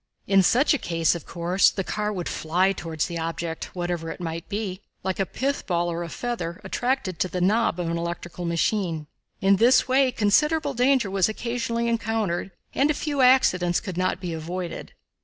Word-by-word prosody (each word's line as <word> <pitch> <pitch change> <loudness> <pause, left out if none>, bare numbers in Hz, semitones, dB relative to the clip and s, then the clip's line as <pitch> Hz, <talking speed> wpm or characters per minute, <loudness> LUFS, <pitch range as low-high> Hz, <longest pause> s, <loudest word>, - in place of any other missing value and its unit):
In 195 0 +5
such 250 - +4
a 295 - 0
case, 165 -2 +1
of 170 -3 -7
course, 175 +3 +3
the 195 - -3
car 210 +2 -2
would 180 -4 -4
fly 180 +4 +1
toward 165 -5 -6
the 170 0 0
object, 165 +1 -4
whatever 175 -2 -3
it - - -6
might 165 -1 -5
be, 200 -2 -3 0.2
like 190 0 -2
a 195 - +1
pith 280 +2 -2
ball 175 -1 0
or 170 +1 -3
a 170 - -5
feather, 230 -6 -4
attracted 210 - -1
to - - +1
the 180 +1 -4
knob 200 0 +2
of 175 - -1
an 170 0 -1
electrical 170 +1 -5
machine. 170 -1 0 0.4
In 195 0 +4
this 240 +6 +5
way, 260 0 +3
considerable 290 +8 +2
danger 250 -4 +2
was 195 0 +2
occasionally 235 +1 -2
encountered, 225 -6 -1 0.2
and 280 +2 +2
a 300 - +2
few 290 -2 -1
accidents 180 -9 +4
could 185 -5 -6
not 185 +1 0
be 180 -3 -4
avoided. 170 +2 -5
190 Hz, 190 wpm, -25 LUFS, 170-235 Hz, 0.4 s, In